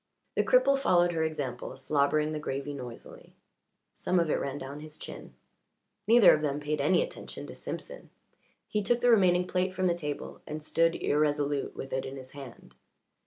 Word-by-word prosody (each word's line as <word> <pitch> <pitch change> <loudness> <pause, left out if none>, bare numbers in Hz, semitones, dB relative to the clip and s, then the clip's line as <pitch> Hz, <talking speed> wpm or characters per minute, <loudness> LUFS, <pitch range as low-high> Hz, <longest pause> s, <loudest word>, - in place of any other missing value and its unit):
The - - +3
cripple 275 - +4
followed 175 -9 +3
her 165 -2 -1
example, 145 -6 -4
slobbering 150 +1 +1
the 155 - -3
gravy 140 0 -4
noisily; 125 -4 -10 0.6
some 180 - 0
of 165 -3 +1
it - - +1
ran 140 0 -3
down 140 +1 -7
his 155 0 -10
chin. - - -10 0.7
Neither 230 -2 +8
of 155 - +1
them 145 -1 -1
paid 150 0 -2
any 155 +6 +3
attention - - -8
to - - -9
Simpson. - - -7 0.6
He 210 - -1
took 235 +4 +1
the 245 - +5
remaining 180 -5 +4
plate 185 +1 -1
from 185 0 0
the 175 - +3
table 150 -4 -5
and 150 0 -5
stood 165 +2 +2
irresolute 145 -1 0
with 135 - -7
it 130 - -1
in 135 +1 -7
his 130 -1 -10
hand. 135 -4 -11
155 Hz, 180 wpm, -29 LUFS, 140-180 Hz, 0.7 s, Neither